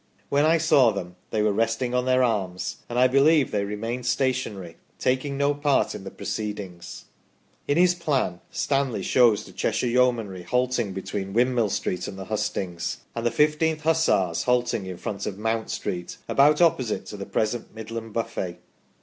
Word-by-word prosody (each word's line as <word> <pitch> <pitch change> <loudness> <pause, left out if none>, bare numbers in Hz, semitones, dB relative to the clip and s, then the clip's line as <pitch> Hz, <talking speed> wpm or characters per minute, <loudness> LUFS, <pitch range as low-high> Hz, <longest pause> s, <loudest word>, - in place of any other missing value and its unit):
When 145 +2 +3
I 165 +1 +4
saw 145 -6 +5
them 90 -4 -5
they 105 -1 0
were 105 -1 +2
resting 115 +3 0
on 125 0 +1
their 130 0 +3
arms, 95 -6 -1
and 120 - -3
I 125 - +6
believe 140 +2 +4
they 100 -1 0
remained 115 +4 -4
stationary, 120 -10 -1 0.2
taking 130 +2 0
no 140 +1 +2
part 145 -1 +1
in - - -8
the - - -5
proceedings". 105 -5 -6 0.6
In 145 - +2
his 180 0 +5
plan 140 - -1
Stanley 135 -8 -1
shows 115 -3 +4
the - - -12
Cheshire 115 +3 -1
Yeomanry 120 -6 +1
halting 125 +1 0
between 95 0 -4
Windmill 120 -1 +2
Street 90 -1 -2
and 95 - -7
the 95 - -6
hustings, 100 -4 -3 0.2
and 115 0 -1
the - - +3
15th 155 +3 +2
Hussars 105 - +2
halting 125 -6 0
in 90 -1 -6
front 100 +2 -4
of 95 - -4
Mount 110 +1 -1
Street, 90 -1 -4
about 150 +4 +4
opposite 130 -9 +1
to 105 - -8
the 100 - -6
present 110 +1 -2
Midland 115 0 -6
Buffet. 110 -6 -3
115 Hz, 170 wpm, -25 LUFS, 100-130 Hz, 0.6 s, I